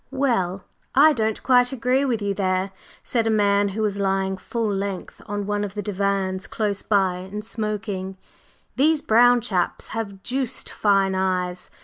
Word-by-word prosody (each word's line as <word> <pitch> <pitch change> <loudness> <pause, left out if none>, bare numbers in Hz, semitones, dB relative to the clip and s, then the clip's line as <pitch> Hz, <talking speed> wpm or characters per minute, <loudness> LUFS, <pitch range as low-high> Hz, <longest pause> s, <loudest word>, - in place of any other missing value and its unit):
"Well, 215 -9 0 0.3
I 305 +3 +7
don't 220 -4 -1
quite 250 -1 +4
agree 260 +2 +1
with 230 -5 -1
you 200 0 0
there," 190 0 0 0.3
said 230 -2 0
a - - +2
man 205 -2 +3
who 210 +3 -3
was 200 -1 -1
lying 195 -1 0
full 220 +2 -2
length 195 -1 -4
on 205 0 -3
one 205 0 -1
of 205 0 -5
the 205 - -3
divans 195 -1 -1
close 205 -2 -1
by 190 -4 +1
and 195 +4 -7
smoking. 210 -4 -4 0.6
"These 305 +3 +3
brown 245 +2 +5
chaps 190 -7 -1
have 200 -4 -5
deuced 260 -1 -3
fine 195 -2 +2
eyes. 185 -1 -1
205 Hz, 160 wpm, -23 LUFS, 190-230 Hz, 0.6 s, I